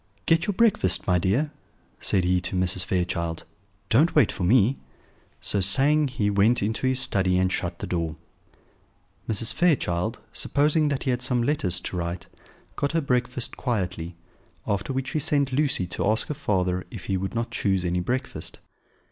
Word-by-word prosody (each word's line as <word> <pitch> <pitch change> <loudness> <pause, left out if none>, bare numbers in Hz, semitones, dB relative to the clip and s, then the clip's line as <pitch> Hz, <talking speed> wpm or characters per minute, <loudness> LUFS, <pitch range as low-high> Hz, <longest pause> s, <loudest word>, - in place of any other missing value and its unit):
"Get 165 +1 +2
your 205 - -1
breakfast, 200 - +4
my 90 -1 +2
dear," 120 - 0 0.5
said 95 - +2
he 90 0 +1
to 95 - -3
Mrs. 90 0 +2
Fairchild; 85 -2 -2 0.5
"don't 150 +9 +3
wait 145 -8 +4
for 90 - -5
me." 115 +6 +3 0.6
So 100 - +1
saying, 140 +10 +4
he 125 -6 -2
went 100 +3 +2
into 110 +5 -1
his 130 0 +3
study 95 -8 +3
and 95 0 +1
shut - - -3
the - - -6
door. 85 -3 -3 1.1
Mrs. 110 +1 +1
Fairchild, 115 - 0
supposing 150 +2 +1
that 140 -2 -2
he 130 - 0
had 125 0 -2
some 125 -1 0
letters 100 - 0
to 90 - -5
write, 85 +1 -4 0.5
got 140 +2 -2
her 165 - +1
breakfast 125 -2 -1
quietly; 90 -8 -3 0.5
after 100 +5 -2
which 135 0 -3
she 155 - -1
sent 140 -2 0
Lucy 140 -8 +1
to 90 +3 -2
ask 110 +1 0
her - - -1
father 90 - -1
if 110 - -9
he 95 - -1
would 95 +4 -4
not 115 0 -2
choose 95 -3 0
any 90 +1 0
breakfast. 125 +9 -4
110 Hz, 175 wpm, -25 LUFS, 90-135 Hz, 1.1 s, breakfast